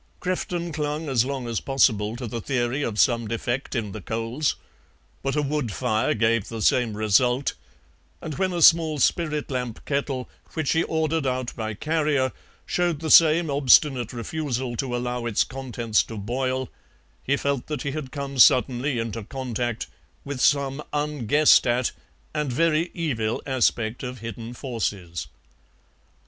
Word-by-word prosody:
Crefton 175 -2 -3
clung 150 +1 -2
as 125 -4 +2
long 135 -2 -4
as 115 -2 -1
possible 110 -5 +2
to 125 +1 -6
the 115 0 -4
theory 125 +2 -1
of 110 -6 -2
some 115 -2 +3
defect 120 +5 -3
in 110 -4 -2
the 110 - -7
coals, 115 - -1 0.7
but 135 +1 -1
a 150 - +1
wood 145 -5 -1
fire 110 0 0
gave 115 -1 +1
the 115 -2 -4
same 115 -4 +2
result, 120 +5 +2 0.7
and 155 - -6
when 190 -1 +1
a 175 -2 +1
small 160 -2 +6
spirit 150 +1 0
lamp 125 -3 -4
kettle, 140 -2 -2 0.3
which 155 -4 0
he 165 - +3
ordered 160 -2 0
out 130 -1 -2
by 110 -1 -4
carrier, 150 -1 +1 0.3
showed 175 -4 0
the 160 0 -2
same 165 -1 +6
obstinate 135 -3 +4
refusal 125 -1 -3
to 125 0 -2
allow 125 -1 -2
its 110 - +2
contents 120 -4 -1
to 110 - -7
boil 130 +4 -2 0.5
he 140 +2 +1
felt 140 -3 -1
that 150 -4 -4
he 140 - -2
had 140 -3 -5
come 140 -2 -5
suddenly 125 +2 +4
into 115 -1 -3
contact 120 -1 -3 0.4
with 140 -2 -4
some 140 0 +2
unguessed 145 -1 +3
at 120 +1 +1 0.4
and 150 -3 -1
very 165 +5 +2
evil 115 -10 -1
aspect 120 -3 0
of 125 0 -5
hidden 115 +1 -7
forces. 105 - -4
130 Hz, 155 wpm, -24 LUFS, 115-150 Hz, 0.7 s, small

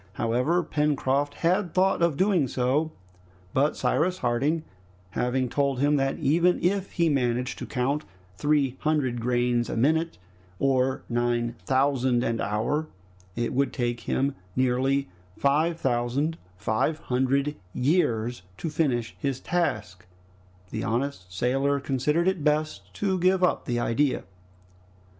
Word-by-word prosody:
However, 125 - +1
Pencroft 145 -2 0
had 180 0 +1
thought 190 -1 +3
of 170 -4 +2
doing 185 -7 +3
so, 135 +6 0 0.6
but 145 +3 +2
Cyrus 155 +9 +1
Harding 140 +5 0 0.5
having 125 +1 0
told 140 +1 0
him 145 +3 +3
that 135 0 0
even 165 +5 +3
if 195 +2 0
he 170 -1 +2
managed 125 -4 0
to - - -6
count 140 +4 -1 0.3
three 140 +2 +1
hundred 140 -6 0
grains 120 0 +1
a - - -3
minute, 160 +7 +1 0.4
or 130 +1 +1
nine 120 0 0
thousand 130 -2 +2
an 115 -2 -1
hour, 120 +10 -1 0.5
it 120 +2 -1
would 135 -1 +1
take 120 -2 -2
him 135 +3 0 0.2
nearly 130 +2 +1 0.3
five 155 +4 +2
thousand 130 +5 0 0.2
five 110 +10 0
hundred 135 +2 0 0.2
years 120 - +1 0.2
to 160 - -4
finish 125 -8 0
his 135 -2 -2
task, 105 - -2 0.6
the 110 - -3
honest 115 -6 -2
sailor 135 +8 +1
considered 145 +6 0
it 190 -5 0
best 155 +1 0
to 190 -2 0
give 185 +1 +3
up 180 - +2
the 120 -1 -1
idea. 130 +4 +1
135 Hz, 130 wpm, -26 LUFS, 120-155 Hz, 0.6 s, thought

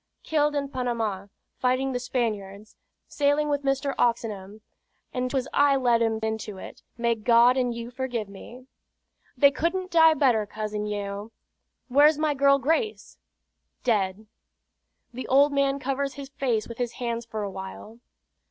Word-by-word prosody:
"Killed 295 -1 +1
in 280 -1 -1
Panama, 230 -7 -2 0.3
fighting 255 +1 +1
the 250 - -2
Spaniards; 215 -5 -3 0.3
sailing 290 +1 +1
with 285 -1 0
Mr. 275 0 0
Oxenham; 215 -3 -1 0.5
and 255 0 -1
'twas 260 -1 -1
I 285 -1 +4
led 240 -3 +2
'em 225 -1 +1
into 220 -2 -3
it. - - -10 0.2
May 235 0 +1
God 235 +2 +4
and 250 -2 +1
you 235 +1 -6
forgive 250 -4 -3
me!" 235 +6 -12 0.7
"They 280 +2 +6
couldn't 365 +5 -2
die 320 -1 +6
better, 240 -8 +2
Cousin 210 0 -4
Yeo. 205 +1 -5 0.6
Where's 290 +4 +5
my 305 -1 +1
girl 275 0 +4
Grace?" 325 - -2 0.6
"Dead." 210 -3 0 0.9
The 255 +2 -6
old 280 +2 +4
man 275 0 +2
covers 275 0 -2
his 280 -1 -8
face 245 -6 -1
with 235 0 -9
his 245 -2 -2
hands 235 -2 -4
for 220 -2 -4
a 200 - -4
while. 190 +4 -9
245 Hz, 150 wpm, -26 LUFS, 220-280 Hz, 0.9 s, They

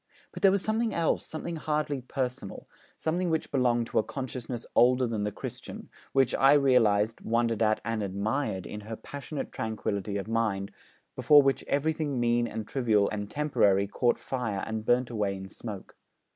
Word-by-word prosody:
But - - -9
there 195 - +7
was 195 0 +1
something 220 +1 0
else, 165 -1 0
something 165 +1 -5
hardly 150 -3 -1
personal, 125 -4 -4 0.3
something 175 +3 -1
which 160 -1 -1
belonged 120 -3 +2
to - - +2
a - - +2
consciousness 125 -2 -5
older 125 +1 +4
than 115 -3 -2
the 105 0 -1
Christian, - - -8 0.2
which 135 -2 +3
I 135 +1 +5
realised, 115 -6 +3
wondered 115 -1 0
at, 110 -1 +3
and 115 -1 -1
admired, 100 +1 -2
in 105 - -6
her 110 +2 -7
passionate 140 +4 -6
tranquillity 100 -2 -3
of 100 - -4
mind, 110 -4 -1 0.4
before 145 -1 +6
which 135 0 +1
everything 145 -2 0
mean 120 0 +2
and 110 -2 -5
trivial 110 -6 +2
and 105 -1 -4
temporary 110 -10 +2
caught 120 +4 +1
fire 115 -7 -3
and 110 -1 -4
burnt 125 0 +2
away 105 -3 -1
in 95 0 -8
smoke. 105 -3 -8
120 Hz, 170 wpm, -28 LUFS, 105-140 Hz, 0.4 s, there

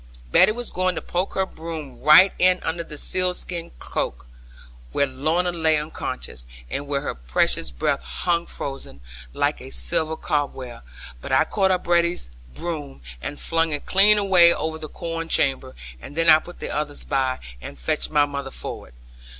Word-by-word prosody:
Betty - - +6
was 240 +2 -4
going 185 0 0
to - - -3
poke 180 +2 -2
her 190 - +1
broom 160 -6 -8
right 165 +7 +7
in 185 0 +4
under 170 +1 -2
the 155 -2 -9
sealskin 180 0 0
cloak, 60 - -3 0.7
where 140 - +3
Lorna 155 +7 0
lay 160 -2 +2
unconscious, 65 - -5 0.2
and 145 - -3
where 140 -1 -1
her - - -3
precious - - +2
breath 60 -1 -1
hung 170 - -1
frozen, 135 - -7 0.3
like - - -1
a - - -9
silver 110 - 0
cobweb; 140 -6 -3 0.4
but - - -7
I - - +5
caught 195 -2 +1
up 185 -1 +1
Betty's 170 - +1 0.2
broom, 145 - -6 0.2
and 145 - -6
flung 165 -1 0
it 145 - -4
clean 205 +2 +5
away 185 -4 +6
over 160 -1 -2
the 155 -1 -7
corn 165 0 -5
chamber; 135 -3 +1 0.3
and 145 - -10
then 165 -1 +6
I 155 - +8
put 175 +2 -13
the - - -4
others 150 -1 -3
by, 130 -2 0 0.2
and 70 - -9
fetched - - 0
my 150 -1 +4
mother 140 -1 -5
forward. 60 - -8
155 Hz, 170 wpm, -23 LUFS, 135-175 Hz, 0.7 s, I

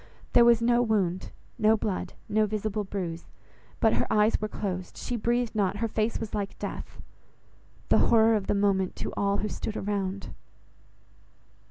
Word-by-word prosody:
There 240 - +7
was 235 -1 +5
no 240 +1 +4
wound, 195 -6 0 0.3
no 220 +1 +4
blood, 205 -3 -3
no 215 0 +2
visible 215 0 -2
bruise; 180 -4 -5 0.5
but 220 - +4
her - - +1
eyes 210 +1 +3
were 215 - -1
closed, 185 -4 -5
she 245 - -3
breathed 240 +1 0
not, 205 -2 0
her 230 +2 0
face 220 +1 -1
was 225 - -6
like 200 -1 -3
death. - - -6 0.9
The - - +5
horror 225 -1 +5
of 205 -3 -2
the - - +1
moment 195 -2 +1
to - - -5
all 200 0 +1
who 210 - -1
stood 215 +1 -4
around! 195 -1 -3
210 Hz, 165 wpm, -27 LUFS, 195-220 Hz, 0.9 s, There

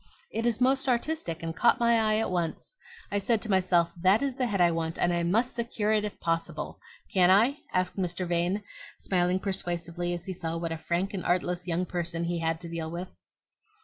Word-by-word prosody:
"It 225 +2 -1
is 230 -2 0
most 265 +1 +2
artistic, 240 - -1
and 165 0 -3
caught 240 - +4
my 235 -1 +4
eye 215 -1 +2
at 220 - 0
once. 175 - -3 0.4
I 205 - +1
said 225 +2 +2
to 220 - -2
myself,' 180 -3 +3
That 190 +7 +4
is 275 -2 0
the 255 -1 -1
head 205 -4 -1
I 175 -1 +5
want, 165 0 -2
and 175 - +2
I 170 - +1
MUST 220 +9 +1
secure 230 -3 -1
it 215 -1 +2
if 210 - -5
possible.' 165 0 -2 0.3
Can 185 -2 +5
I?" 230 +9 +5
asked 185 +1 0
Mr. 180 -1 -1
Vane, 175 +4 0 0.3
smiling 180 -1 +1
persuasively 175 -2 -2
as 175 0 -7
he 190 - -4
saw 165 -2 -3
what 165 0 -3
a 165 - -2
frank 175 +5 -1
and 190 - -3
artless 180 0 0
young 175 +1 0
person 170 -1 -2
he 170 0 -1
had 165 0 0
to 170 - -5
deal 165 -1 -4
with. 175 +3 -5
180 Hz, 215 wpm, -28 LUFS, 170-215 Hz, 0.4 s, I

